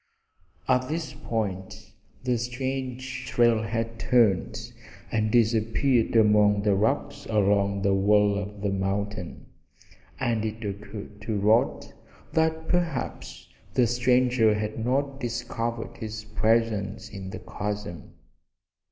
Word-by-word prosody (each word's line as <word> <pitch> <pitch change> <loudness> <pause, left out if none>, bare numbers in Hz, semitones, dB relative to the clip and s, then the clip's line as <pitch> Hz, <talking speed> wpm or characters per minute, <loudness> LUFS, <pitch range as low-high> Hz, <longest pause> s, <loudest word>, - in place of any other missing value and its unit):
At 130 0 +2
this 160 -1 -3
point 105 -5 -4 0.3
the 125 -1 +1
strange 130 0 -4
trail 120 -3 +3
had 115 0 -3
turned 110 -7 +2 0.4
and 110 0 +1
disappeared 115 +2 +2
among 105 -2 +5
the 105 -1 +3
rocks 135 +8 0
along 100 -2 +2
the 100 -1 +3
wall 105 +1 +4
of 100 0 -5
the 100 -1 0
mountain, 100 -1 -3 0.7
and 115 -3 0
it 110 0 -4
occurred 105 +1 -7
to 110 -2 -2
Rod 110 +4 +2 0.4
that 160 0 +1
perhaps 135 - -2 0.3
the 125 - +5
stranger 120 -2 +3
had 110 +1 -3
not 135 +2 0
discovered 115 -1 -3
his 110 0 -6
presence 110 -1 0
in 100 -2 -8
the - - -6
chasm. 105 -6 -5
110 Hz, 115 wpm, -26 LUFS, 105-125 Hz, 0.7 s, among